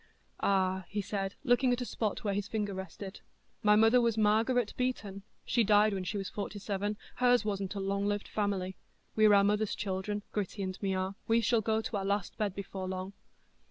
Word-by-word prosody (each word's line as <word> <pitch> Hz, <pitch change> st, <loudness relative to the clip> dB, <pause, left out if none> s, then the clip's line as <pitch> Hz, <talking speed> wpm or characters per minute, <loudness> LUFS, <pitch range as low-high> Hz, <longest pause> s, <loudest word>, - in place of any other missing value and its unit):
"Ah," 190 Hz, -1 st, +1 dB
he 205 Hz, -, -2 dB
said, 195 Hz, -1 st, -3 dB
looking 250 Hz, -1 st, +3 dB
at 245 Hz, -, +1 dB
a 250 Hz, -, -2 dB
spot 215 Hz, -3 st, -2 dB
where 205 Hz, -2 st, 0 dB
his 200 Hz, 0 st, -2 dB
finger 210 Hz, -2 st, -2 dB
rested, 190 Hz, +1 st, -7 dB, 0.4 s
"my 210 Hz, -2 st, +5 dB
mother 225 Hz, +3 st, +6 dB
was 230 Hz, -2 st, +1 dB
Margaret 220 Hz, +2 st, +2 dB
Beaton; 220 Hz, -6 st, -2 dB, 0.2 s
she 235 Hz, -, +2 dB
died 210 Hz, 0 st, +4 dB
when 190 Hz, -2 st, -3 dB
she 205 Hz, -, -2 dB
was 195 Hz, -1 st, -3 dB
forty 205 Hz, 0 st, -5 dB
seven,—hers 210 Hz, +4 st, 0 dB
wasn't 200 Hz, -2 st, -2 dB
a -, -, -2 dB
long 200 Hz, +1 st, -1 dB
lived 205 Hz, 0 st, -1 dB
family; 195 Hz, -3 st, -2 dB, 0.4 s
we're 215 Hz, -1 st, +6 dB
our 200 Hz, -, +6 dB
mother's 210 Hz, +1 st, +1 dB
children, 205 Hz, +1 st, -3 dB
Gritty 200 Hz, 0 st, -3 dB
and 185 Hz, 0 st, -5 dB
me 195 Hz, -2 st, 0 dB
are,—we 195 Hz, +5 st, 0 dB
shall 230 Hz, -1 st, +2 dB
go 220 Hz, +1 st, +1 dB
to 220 Hz, -, -3 dB
our 195 Hz, -, -2 dB
last 200 Hz, -1 st, -1 dB
bed 205 Hz, -3 st, -1 dB
before 190 Hz, -1 st, -5 dB
long." 185 Hz, +1 st, -4 dB
205 Hz, 195 wpm, -31 LUFS, 195-220 Hz, 0.4 s, mother